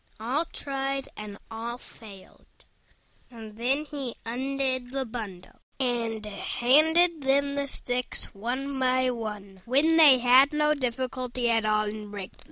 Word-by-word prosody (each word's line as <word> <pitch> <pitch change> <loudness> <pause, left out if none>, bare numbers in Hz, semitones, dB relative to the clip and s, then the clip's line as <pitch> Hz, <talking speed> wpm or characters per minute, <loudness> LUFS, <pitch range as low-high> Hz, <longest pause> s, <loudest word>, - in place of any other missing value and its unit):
All 260 +9 -1
tried 275 -2 -3
and 210 -1 -8
all 230 +2 -5
failed: 205 -6 -15 0.8
and 220 -3 -11
then 260 +6 -1
he 280 -5 -5
undid 260 +1 -2
the 265 +1 -3
bundle, 210 -6 -8 0.2
and 230 -4 -1
handed 310 - +2
them 280 +1 +1
the 280 0 -2
sticks 250 -2 +2
one 260 +6 -4
by 255 0 +2
one, 210 -5 -7
when 295 +7 +3
they 295 -5 +8
had 255 +4 +5
no 300 0 +2
difficulty 255 -2 -2
at 225 -1 +1
all 215 0 +2
in 210 0 -6
breaking 200 -2 -7
them. - - -28
250 Hz, 140 wpm, -27 LUFS, 225-275 Hz, 0.8 s, they